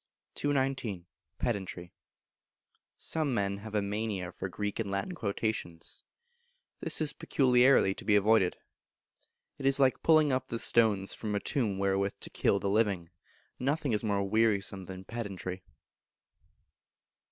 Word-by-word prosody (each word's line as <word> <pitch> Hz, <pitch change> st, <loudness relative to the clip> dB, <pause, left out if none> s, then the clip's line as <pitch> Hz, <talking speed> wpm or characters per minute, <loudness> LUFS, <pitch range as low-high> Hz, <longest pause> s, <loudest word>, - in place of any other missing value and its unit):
219. 130 Hz, -10 st, -1 dB, 0.3 s
Pedantry. 95 Hz, -6 st, -3 dB, 1.0 s
Some 155 Hz, -6 st, -1 dB
Men 100 Hz, -1 st, 0 dB
have 110 Hz, +1 st, -8 dB
a 105 Hz, -, +2 dB
Mania 100 Hz, -3 st, -3 dB
for 95 Hz, -, -5 dB
Greek 105 Hz, +3 st, -3 dB
and 110 Hz, -3 st, -2 dB
Latin 100 Hz, -, -2 dB
quotations: 100 Hz, -, -3 dB, 0.8 s
this -, -, -1 dB
is 150 Hz, -1 st, 0 dB
peculiarly 125 Hz, -5 st, +4 dB
to -, -, -10 dB
be 105 Hz, -, +3 dB
avoided. 105 Hz, -2 st, +4 dB, 1.0 s
It 135 Hz, -, 0 dB
is 135 Hz, +1 st, +4 dB
like 130 Hz, -2 st, +3 dB
pulling 155 Hz, -3 st, +5 dB
up 130 Hz, 0 st, 0 dB
the 115 Hz, -, -3 dB
stones 110 Hz, -4 st, +3 dB
from 105 Hz, -2 st, -3 dB
a -, -, +1 dB
tomb 110 Hz, -6 st, -1 dB
wherewith 100 Hz, 0 st, 0 dB
to -, -, -7 dB
kill 100 Hz, -, +2 dB
the 100 Hz, -, -2 dB
living. 100 Hz, -4 st, +1 dB, 0.5 s
Nothing 140 Hz, 0 st, 0 dB
is 105 Hz, -, +1 dB
more 100 Hz, -2 st, 0 dB
wearisome 100 Hz, -3 st, +1 dB
than 95 Hz, 0 st, -8 dB
pedantry. 95 Hz, -5 st, -5 dB
105 Hz, 135 wpm, -30 LUFS, 100-125 Hz, 1.0 s, pulling